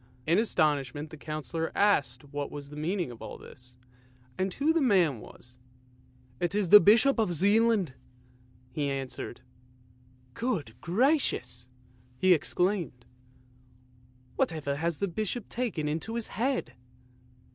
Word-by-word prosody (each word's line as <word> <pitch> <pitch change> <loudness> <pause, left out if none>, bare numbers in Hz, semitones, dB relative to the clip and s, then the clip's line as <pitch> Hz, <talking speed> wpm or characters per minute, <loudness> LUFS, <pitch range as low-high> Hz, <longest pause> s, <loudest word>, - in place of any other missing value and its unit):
In 170 +5 +3
astonishment 150 - 0
the - - -8
Councillor 155 +1 -4
asked 140 - +2
what 145 -1 -3
was 145 -1 -8
the - - -9
meaning 170 -1 -2
of 115 - -12
all - - -7
this, 125 -1 -14 0.6
and 185 +1 -1
who 300 +3 +2
the 330 - +2
man 180 - +3
was? 120 +3 -15 0.4
" 125 0 -30
It 175 +3 -1
is 205 -4 +1
the 210 - +11
Bishop 230 +6 +5
of 210 -6 +1
Zealand! 205 - +3 0.4
" 125 0 -30
he 145 +2 -2
was 140 - -1
answered. 135 -3 -6 0.5
" 125 +1 -31
Good 180 - -1
gracious! 190 - 0 0.2
" 125 0 -31
he 185 +4 +5
exclaimed, 175 - -1 0.7
" 125 0 -31
whatever 145 -4 -1
has 165 0 -1
the 200 - -1
Bishop 215 +4 -3
taken 225 -11 -2
into 165 +10 -3
his 235 -2 -3
head? 255 +3 -1
155 Hz, 145 wpm, -29 LUFS, 125-205 Hz, 0.7 s, the